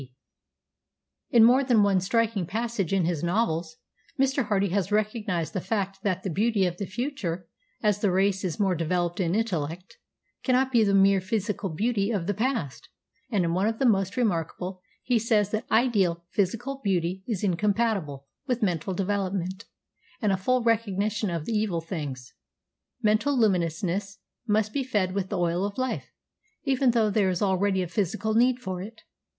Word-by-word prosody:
] - - -61 0.5
"In 235 -2 +6
more 250 +4 +6
than 240 -5 +4
one 200 -2 +3
striking 215 -2 0
passage 220 -2 -2
in 190 -3 +2
his 165 -3 -1
novels 170 -3 -1 0.4
Mr. 270 -3 +2
Hardy 200 -2 +1
has 195 +1 -1
recognised 210 -5 -1
the 190 - -2
fact 195 -2 -2
that 190 -3 -1
the 190 - -2
beauty 210 +2 +2
of 175 -1 -2
the 200 - -4
future, 190 - -3 0.4
as 210 -1 +2
the 205 - +3
race 190 +1 +1
is 180 -1 -3
more 195 -3 +2
developed 175 +1 -1
in 175 -1 +1
intellect, 180 -5 -3 0.4
cannot 260 0 +2
be 235 -3 +4
the 200 -1 +2
mere 195 0 +5
physical 205 0 -2
beauty 200 +4 0
of 200 -7 -1
the 205 - 0
past; 215 - -2 0.4
and 200 -7 +1
in 165 - 0
one 190 +4 +1
of 225 0 -1
the 270 - +1
most 195 -1 +2
remarkable 185 -3 -1 0.2
he 245 -2 +2
says 210 -2 +1
that 215 - -3
'ideal 200 -8 +2
physical 230 +8 -1
beauty 185 -1 0
is 215 -6 -2
incompatible 195 - 0 0.2
with 250 -3 0
mental 180 -1 -1
development, 195 0 -2 0.5
and 210 -3 +1
a - - +3
full 250 +6 +1
recognition 215 -2 0
of 165 -3 -3
the 230 - -2
evil 210 -5 0
of 165 - -5
things. 140 -8 -6 0.7
Mental 220 +7 +2
luminousness 195 -1 0 0.3
must 215 0 +1
be 280 - 0
fed 205 -7 0
with 190 -1 -2
the 200 - -2
oil 175 +1 0
of 200 0 -3
life, 255 0 -3 0.5
even 270 -2 +2
though 225 -3 +2
there 200 -2 +2
is 180 +2 -1
already 190 -1 +1
a - - -4
physical 205 +4 -1
need 245 +2 +4
for 185 -7 -5
it. 220 +4 -9
200 Hz, 175 wpm, -26 LUFS, 180-225 Hz, 0.7 s, In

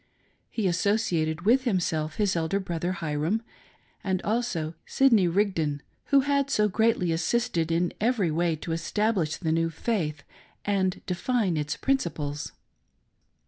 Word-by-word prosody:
He 220 - -2
associated 175 -4 +1
with 245 +7 +3
himself 160 -8 0
his 205 -4 +1
elder 165 +4 0
brother, 175 -1 -2
Hyrum, 165 +6 -1 0.6
and 190 -1 0
also 205 -8 -1
Sidney 230 -9 +4
Rigdon, 165 -6 0 0.2
who 280 -1 +4
had 280 0 +1
so 210 -6 +3
greatly 210 -3 +2
assisted 165 -1 0
in 170 +1 +1
every 215 -7 +2
way 165 +1 +1
to 160 +2 -6
establish 170 0 0
the 160 -3 -1
new 165 +1 +1
faith 160 -4 -2 0.4
and 190 -2 0
define 195 0 0
its 150 -1 -2
principles. 155 - -1
180 Hz, 130 wpm, -27 LUFS, 160-220 Hz, 0.6 s, Sidney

